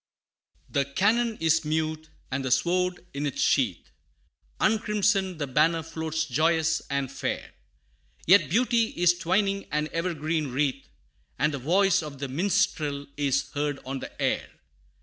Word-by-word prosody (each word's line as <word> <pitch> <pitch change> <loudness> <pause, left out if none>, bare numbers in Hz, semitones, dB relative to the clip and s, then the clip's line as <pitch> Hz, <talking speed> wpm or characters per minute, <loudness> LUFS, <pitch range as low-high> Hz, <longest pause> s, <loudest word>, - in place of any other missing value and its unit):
The 140 - +1
cannon 220 - +1
is 160 0 +2
mute 155 0 -2 0.2
and 135 +1 -2
the 130 - -2
sword 180 +6 +1
in 145 +1 -2
its 140 - -5
sheath - - +1 0.7
Uncrimsoned 210 -4 +1
the 150 - -2
banner 160 +5 +2
floats 160 0 -3
joyous 160 +3 +1
and 140 -2 -1
fair: - - -4 0.7
Yet 180 -5 +6
beauty 235 +4 +3
is 175 0 +5
twining 195 +2 0
an 150 +1 -1
evergreen 160 -2 -1
wreath, 135 - -1 0.5
And 150 +3 +1
the 140 - -3
voice 185 +8 +3
of 150 -3 -8
the 140 +1 -4
minstrel 155 -2 0
is 140 -2 0
heard 145 -1 -1
on 135 +1 -4
the - - -10
air. - - 0
160 Hz, 140 wpm, -26 LUFS, 145-185 Hz, 0.7 s, Yet